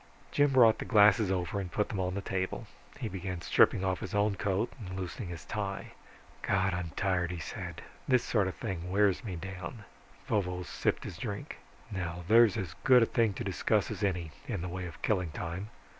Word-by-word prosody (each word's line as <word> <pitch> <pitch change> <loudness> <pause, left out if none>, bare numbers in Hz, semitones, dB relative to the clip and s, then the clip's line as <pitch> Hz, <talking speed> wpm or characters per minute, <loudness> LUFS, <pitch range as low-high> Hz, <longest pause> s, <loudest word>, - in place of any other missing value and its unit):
Jim 145 -1 +3
brought 120 -4 +6
the - - -2
glasses 105 -2 +5
over 95 +1 -1
and 90 -3 -5
put 105 - 0
them 100 - -3
on 90 0 -1
the 100 - -2
table. 95 -1 -2 0.3
He - - -2
began 95 -1 -4
stripping 95 - +4
off 95 -1 0
his - - -5
own 105 0 +3
coat, 100 +3 -1 0.2
loosening 95 +2 -5
his 85 -3 -7
tie. 100 -2 -4 0.5
"God, 95 -1 +1
I'm 85 -1 -3
tired," 90 -3 +1
he 90 - -4
said. 85 - -6 0.2
"This 125 -2 +4
sort 105 -5 +1
of 95 - -4
thing 90 -5 -4
wears 100 +3 +3
me 100 -6 -4
down." 95 +4 -7 0.4
Vovo 90 -3 0
sipped - - -1
his - - -7
drink. - - -5 0.3
"Now 90 -2 -4
there's 115 -1 +6
as 95 -8 -3
good 125 -3 +7
a - - +5
thing 115 -4 +2
to - - -4
discuss - - +1
as - - -5
any, 90 -5 -1 0.2
in 100 -7 -2
the 90 - -3
way 90 0 -4
of 85 - -12
killing 90 -5 +1
time. 85 +6 -5
95 Hz, 200 wpm, -31 LUFS, 90-105 Hz, 0.5 s, good